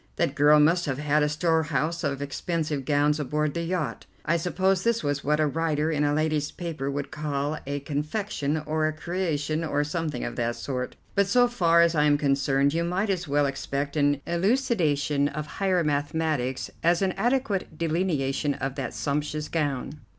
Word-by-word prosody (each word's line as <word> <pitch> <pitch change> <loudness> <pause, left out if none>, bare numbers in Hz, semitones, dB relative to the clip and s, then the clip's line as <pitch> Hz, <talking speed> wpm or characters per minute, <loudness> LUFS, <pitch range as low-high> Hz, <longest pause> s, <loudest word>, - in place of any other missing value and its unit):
That - - 0
girl 150 +1 +5
must 165 +3 +3
have 135 -2 -1
had 150 +1 +1
a 150 - +2
storehouse 160 0 0
of 140 -1 -1
expensive 150 -1 -2
gowns 145 +1 +2
aboard 150 +1 -1
the 170 - -2
yacht. 170 -3 -3 0.2
I 170 - +2
suppose 185 +2 +1
this 230 -4 +1
was 145 -1 -1
what 150 +1 +1
a 155 - +3
writer 155 0 0
in 150 -2 +1
a 145 - +2
lady's 155 -1 0
paper 160 -6 -4
would 140 0 -4
call 150 -1 -2
a 140 0 -2
confection, 150 +1 -2
or 155 0 +1
a 155 - -1
creation, 155 -2 -2
or 145 -2 0
something 155 0 -3
of - - -4
that 120 -1 0
sort; 125 -2 -4 0.2
but 200 -1 +2
so 245 +4 +4
far 170 -8 +4
as 170 0 +3
I 150 -2 +3
am 145 -1 +4
concerned 140 0 +2
you 165 +1 0
might 190 +4 0
as 180 -4 -2
well 145 +1 +2
expect 140 +1 -3
an 145 -1 +2
elucidation 170 - +1
of 150 +1 -4
higher 185 +2 0
mathematics 145 -3 -1
as 170 +3 +3
an 190 - +2
adequate 215 - -1
delineation 155 -4 0
of 135 0 -3
that 135 -3 -5
sumptuous 150 +1 -2
gown. 145 -2 -2
150 Hz, 180 wpm, -26 LUFS, 145-170 Hz, 0.2 s, girl